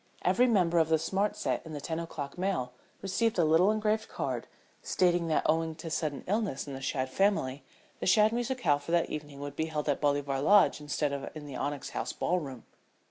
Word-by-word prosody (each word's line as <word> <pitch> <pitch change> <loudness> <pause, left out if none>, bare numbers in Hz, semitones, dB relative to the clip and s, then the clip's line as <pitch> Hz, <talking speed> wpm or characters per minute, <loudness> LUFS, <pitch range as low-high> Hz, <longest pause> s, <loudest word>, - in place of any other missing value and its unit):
Every 250 +1 +4
member 180 -7 +3
of 160 -1 +2
the 160 - +4
smart 190 +6 0
set - - -2
in 160 - -9
the 145 - -4
ten 160 +3 -3
o'clock 155 -4 -6
mail 180 -10 -1 0.3
received 215 +3 0
a 170 - +4
little 165 +5 +5
engraved 215 0 0
card - - -3 0.3
stating 175 -2 +2
that 160 - +1
owing 160 0 +1
to 165 0 -7
sudden 155 -3 -2
illness 205 -8 -1
in 140 - -7
the 135 - -6
Shadd 130 -1 -1
family 145 -4 +1 0.4
the - - -2
Shadd 210 +3 +5
musicale 240 - +1
for 155 - -7
that 170 -1 +2
evening 145 -2 -6
would 145 0 -6
be 160 - 0
held 155 -2 -3
at 145 - 0
Bolivar 145 -2 +1
Lodge 200 -1 +5
instead 145 0 -1
of 140 -1 -4
in 155 -1 -7
the 140 -3 -8
Onyx 145 +1 -3
House 120 - -3
ballroom. 140 -9 -2
160 Hz, 205 wpm, -30 LUFS, 145-190 Hz, 0.4 s, little